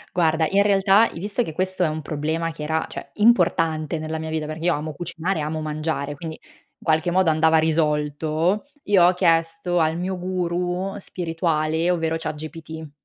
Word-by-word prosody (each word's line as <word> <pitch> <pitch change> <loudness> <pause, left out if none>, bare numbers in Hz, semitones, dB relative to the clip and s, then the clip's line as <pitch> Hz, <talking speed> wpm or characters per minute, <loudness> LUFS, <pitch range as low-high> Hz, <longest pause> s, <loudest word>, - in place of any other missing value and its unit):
guarda, 160 -2 +3
in 200 +1 +4
realtà, 200 +2 +4
i - - -7
visto 205 +5 -1
che 160 -9 -3
questo 185 0 0
è - - +2
un 155 0 -3
problema 160 +3 -2
che 150 - -8
era, 160 +1 0
cioè, - - -8
importante 165 -8 +2
nella 155 0 -4
mia 160 0 -5
vita, 155 -1 -2
perché 155 +2 -5
io 175 - +4
amo 155 +1 -3
cucinare, 175 +1 -3
amo 155 +1 -2
mangiare, 155 -1 -3
quindi 160 +2 -7
in - - -24
qualche 160 +2 +2
modo 185 -2 +3
andava 160 +1 +4
risolto, 155 - 0 0.2
io 195 -4 +5
ho 180 - +5
chiesto 165 0 +1
al 160 0 +1
mio 185 +2 -2
guru 180 +1 -2
spirituale, 165 -3 -1
ovvero 165 -2 0
ChatGPT. 160 0 -7
165 Hz, 175 wpm, -23 LUFS, 155-180 Hz, 0.2 s, io